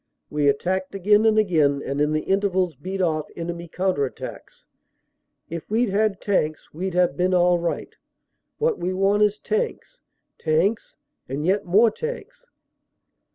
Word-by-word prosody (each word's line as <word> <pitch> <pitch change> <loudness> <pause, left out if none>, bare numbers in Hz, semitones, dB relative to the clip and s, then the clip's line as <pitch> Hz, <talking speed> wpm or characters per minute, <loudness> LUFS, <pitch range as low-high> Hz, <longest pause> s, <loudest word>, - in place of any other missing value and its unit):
We 150 -1 +1
attacked 185 +7 0
again 210 +3 +4
and 220 -1 +3
again 155 -9 +2
and 140 +1 -2
in 150 +1 +2
the 155 0 0
intervals 190 -3 +1
beat 190 +1 -3
off 155 -3 0
enemy 170 0 -5
counter 180 -3 0
attacks. 135 - -7 0.8
If 165 -1 -7
we 225 +4 +2
d 205 - -4
had 205 -1 +1
tanks 155 -6 -1
we 185 +5 -3
d 180 - -5
have 180 -1 +3
been 185 +1 +1
all 175 0 +4
right. 170 0 -3 0.6
What 460 -1 0
we 185 +1 -1
want 195 +2 +2
is 210 0 +3
tanks, 470 - -3 0.4
tanks 180 +8 0 0.3
and 140 +4 -3
yet 195 +3 +1
more 210 +6 +4
tanks." - - -7
185 Hz, 155 wpm, -23 LUFS, 165-210 Hz, 0.8 s, again